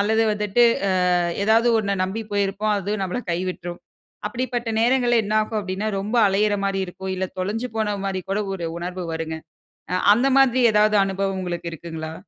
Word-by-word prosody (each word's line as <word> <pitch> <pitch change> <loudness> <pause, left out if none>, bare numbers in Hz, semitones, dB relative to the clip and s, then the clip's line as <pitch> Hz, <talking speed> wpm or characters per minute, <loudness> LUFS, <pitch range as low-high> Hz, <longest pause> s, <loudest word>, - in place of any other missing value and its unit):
அல்லது 220 +2 +2
வந்துட்டு 210 +3 +1 0.3
ஆ - - +1 0.5
ஏதாவது 225 +3 +4
ஒண்ண 200 -2 -1
நம்பி 200 +4 -4
போயிருப்போம் 205 +1 0
அதுவு 205 +3 -2
நம்மள 190 +6 -2
கைவிட்ரும். 175 0 -4 0.5
அப்படிப்பட்ட 240 +1 -3
நேரங்கள்ல 240 -1 +3
என்னாகு 215 +2 0
அப்படின்னா 195 +1 -4
ரொம்ப 210 +5 -2
அலையிற 205 +2 +2
மாரி 195 -1 0
இருக்கும். 190 +1 -6
இல்ல 190 - -1 0.2
தொலஞ்சு 220 +6 -2
போன 215 -2 0
மாரி 190 -1 -2
கூட 200 +2 0
ஒரு 175 -3 -4
உணர்வு 180 +1 -5
வருங்க. 160 0 -4 0.8
அந்த 240 +5 +1
மாதிரி 260 -2 +4
ஏதாவது 210 0 +4
அனுபவம் 195 0 -2
உங்களுக்கு 175 -2 -4
இருக்குங்களா? 160 -1 -6
200 Hz, 155 wpm, -23 LUFS, 185-220 Hz, 0.8 s, ஏதாவது